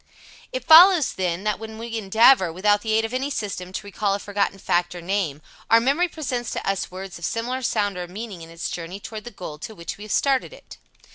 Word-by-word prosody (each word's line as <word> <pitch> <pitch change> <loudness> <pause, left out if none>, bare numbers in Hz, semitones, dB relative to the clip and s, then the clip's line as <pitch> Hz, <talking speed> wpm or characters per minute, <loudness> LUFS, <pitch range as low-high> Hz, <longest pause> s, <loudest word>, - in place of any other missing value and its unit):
It - - -4
follows, 330 -2 +8
then, 180 0 -2
that 210 -1 -1
when 220 0 -8
we 230 0 -6
endeavor, 215 -1 +5
without 205 +4 +2
the 220 0 -1
aid 225 +1 +3
of 225 - -6
any 265 +2 -1
system, 200 -8 -4
to 200 - -6
recall 200 0 -1
a - - -4
forgotten 200 -1 -1
fact 175 -2 0
or - - -6
name, 170 -6 -2 0.3
our 230 - +7
memory 280 +9 +2
presents 255 -8 -4
to - - -4
us 195 -1 -1
words 185 -1 -8
of 170 - -4
similar 245 +3 -2
sound 205 -5 0
or 175 - -5
meaning 200 -1 -7
in 165 - -10
its 165 +1 -5
journey 175 +3 -6
toward 215 +1 -8
the - - -6
goal 180 -8 -8
to 220 +7 -8
which 170 +2 -7
we - - -8
have 215 - -8
started 275 - +1
it. - - -14
205 Hz, 230 wpm, -23 LUFS, 185-235 Hz, 0.3 s, follows